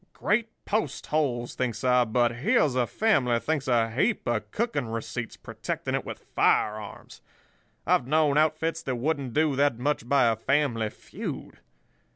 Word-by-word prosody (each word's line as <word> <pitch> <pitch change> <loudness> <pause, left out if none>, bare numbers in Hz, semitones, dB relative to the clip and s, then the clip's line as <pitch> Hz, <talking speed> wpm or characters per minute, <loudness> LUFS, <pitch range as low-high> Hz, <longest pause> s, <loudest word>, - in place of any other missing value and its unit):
'Great 215 +3 +1 0.2
post 205 - -1
holes!' 130 -6 -1
thinks 120 -3 -3
I, 125 -1 +4
'but 120 +1 +1
here's 135 +2 +2
a 125 -2 +1
family 135 - +2
thinks 150 +1 -2
a 115 -3 +2
heap 170 - 0
of 110 -3 -1
cooking 220 - -1
receipts, 115 +1 -5
protecting - - -5
it - - 0
with - - -8
firearms. 105 -1 0 0.6
I've 125 - +2
known 150 0 +3
outfits 155 +2 +1
that 130 -5 -3
wouldn't 135 -1 -2
do 155 -2 +2
that 140 -4 +2
much 125 -1 -2
by 140 -2 +4
a 115 - +1
family 120 -2 0
feud. - - -8
130 Hz, 155 wpm, -27 LUFS, 120-155 Hz, 0.6 s, I